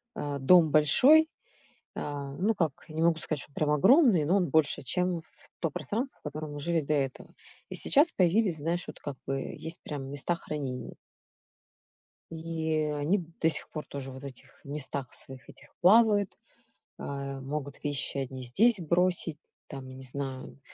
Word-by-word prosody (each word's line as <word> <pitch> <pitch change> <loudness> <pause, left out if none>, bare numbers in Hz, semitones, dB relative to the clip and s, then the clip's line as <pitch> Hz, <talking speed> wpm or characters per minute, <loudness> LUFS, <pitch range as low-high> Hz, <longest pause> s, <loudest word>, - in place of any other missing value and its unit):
А, 145 -1 -3
дом 160 +3 +6
большой, 270 - +6 0.7
а, 140 -1 -5
ну 210 +5 +2
как, 160 -7 -2
не 155 +1 -3
могу 165 -1 +4
сказать, 155 -2 -3
что - - -11
он - - -29
прям 150 - 0
огромный, 195 - +5
но 185 +6 +3
он 180 -3 +1
больше, 160 -4 +2
чем 180 +6 -1
в - - -28 0.4
то 165 - 0
пространство, 240 - -3
в - - -39
котором 150 0 -5
мы 145 - -6
жили 165 +2 0
до 150 +2 -1
этого. 135 -3 -2 0.4
И - - -6
сейчас 305 +5 +4
появились, 185 0 +2
знаешь, 170 +4 -2
вот - - -9
как 145 -2 -6
бы 135 0 -1 0.2
есть 165 +1 -6
прям 145 -3 -5
места 145 +5 -1
хранения. 140 -6 -5 1.4
И 160 -1 -2
они 165 +6 0 0.2
до 160 - +4
сих - - -1
пор 155 - -6
тоже 135 -1 -7
вот 130 - -10
в - - -9
этих 130 0 -12
местах 140 -2 -3
своих 130 -1 -8
этих 140 - -15
плавают, 205 0 +5 0.7
а, 140 -1 -5
могут 140 +1 -5
вещи 145 -1 -2
одни 130 -1 -4
здесь 210 - +3
бросить, 170 -1 +1 0.3
там, 135 -2 -8
не 130 0 -10
знаю, 130 0 -5
155 Hz, 170 wpm, -29 LUFS, 140-175 Hz, 1.4 s, дом